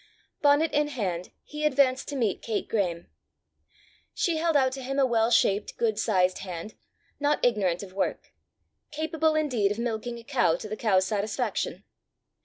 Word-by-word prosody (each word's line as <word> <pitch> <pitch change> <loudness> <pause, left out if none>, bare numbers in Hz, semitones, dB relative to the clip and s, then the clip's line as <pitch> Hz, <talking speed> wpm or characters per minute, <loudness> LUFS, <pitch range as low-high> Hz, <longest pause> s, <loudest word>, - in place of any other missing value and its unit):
Bonnet 290 +2 +4
in 295 0 +2
hand 190 -11 -3
he 300 0 -7
advanced 265 -3 +2
to 290 - -5
meet 225 -7 0
Kate 220 -3 -2
Graeme. 180 -6 -1 1.1
She 335 -3 +1
held 325 -1 +2
out 260 -2 +3
to 265 +1 -6
him 270 +2 -4
a 275 - +4
well 230 -2 +2
shaped, 205 -3 +2
good 220 -3 0
sized 185 -4 +2
hand, 185 +2 -7 0.5
not 290 -1 +1
ignorant 200 -7 +1
of 185 -2 -10
work 195 - -2 0.6
capable 315 +1 0
indeed 250 -10 +1
of 210 - -3
milking 235 0 -3
a 235 - -11
cow 225 - +2
to 215 - -7
the 215 - -4
cow's 190 -5 +2
satisfaction. 205 +2 -2
235 Hz, 165 wpm, -27 LUFS, 200-285 Hz, 1.1 s, Bonnet